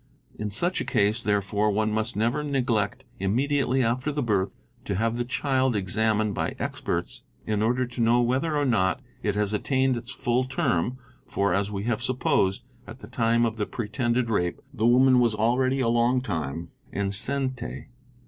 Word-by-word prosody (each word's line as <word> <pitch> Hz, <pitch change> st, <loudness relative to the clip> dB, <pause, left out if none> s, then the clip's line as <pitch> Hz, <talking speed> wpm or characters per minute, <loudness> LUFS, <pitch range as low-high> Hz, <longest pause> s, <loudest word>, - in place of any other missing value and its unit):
In 105 Hz, -, -4 dB
such 175 Hz, -, -1 dB
a -, -, -1 dB
case, 110 Hz, -1 st, +1 dB
therefore, 105 Hz, 0 st, +1 dB
one 110 Hz, +1 st, +1 dB
must 110 Hz, +2 st, -1 dB
never 120 Hz, +8 st, 0 dB
neglect 125 Hz, -5 st, 0 dB, 0.2 s
immediately 130 Hz, +5 st, +1 dB
after 130 Hz, +5 st, 0 dB
the 145 Hz, -1 st, -2 dB
birth 100 Hz, -5 st, 0 dB, 0.3 s
to 100 Hz, -, -2 dB
have 115 Hz, +3 st, 0 dB
the 120 Hz, -, -1 dB
child 130 Hz, 0 st, 0 dB
exam 105 Hz, +3 st, +1 dB
ined 105 Hz, -1 st, 0 dB
by 80 Hz, -3 st, -2 dB
experts -, -, -3 dB, 0.2 s
in 105 Hz, -1 st, 0 dB
order 125 Hz, +3 st, +2 dB
to 120 Hz, 0 st, -5 dB
know 115 Hz, +1 st, +4 dB
whether 135 Hz, +6 st, +1 dB
or 145 Hz, -, +1 dB
not 110 Hz, -4 st, +2 dB, 0.2 s
it 105 Hz, -1 st, -1 dB
has 105 Hz, 0 st, 0 dB
attained 130 Hz, +4 st, +1 dB
its 120 Hz, +1 st, -8 dB
full 125 Hz, -1 st, 0 dB
term, 125 Hz, -3 st, 0 dB, 0.3 s
for, 100 Hz, -2 st, 0 dB
as 100 Hz, +2 st, 0 dB
we 100 Hz, -1 st, -3 dB
have 115 Hz, 0 st, -1 dB
supposed, 125 Hz, -, +1 dB, 0.2 s
at -, -, -9 dB
the -, -, -9 dB
time 115 Hz, 0 st, +2 dB
of 115 Hz, -1 st, -2 dB
the 105 Hz, -, -1 dB
pretended 120 Hz, +2 st, -1 dB
rape 90 Hz, -4 st, 0 dB
the 115 Hz, -3 st, +1 dB
woman 130 Hz, +1 st, +5 dB
was 120 Hz, -3 st, +2 dB
already 130 Hz, +5 st, +2 dB
a 120 Hz, -, +1 dB
long 120 Hz, +2 st, +3 dB
time 85 Hz, -, -4 dB, 0.2 s
enceinte. 125 Hz, +7 st, -2 dB
115 Hz, 175 wpm, -26 LUFS, 105-130 Hz, 0.3 s, woman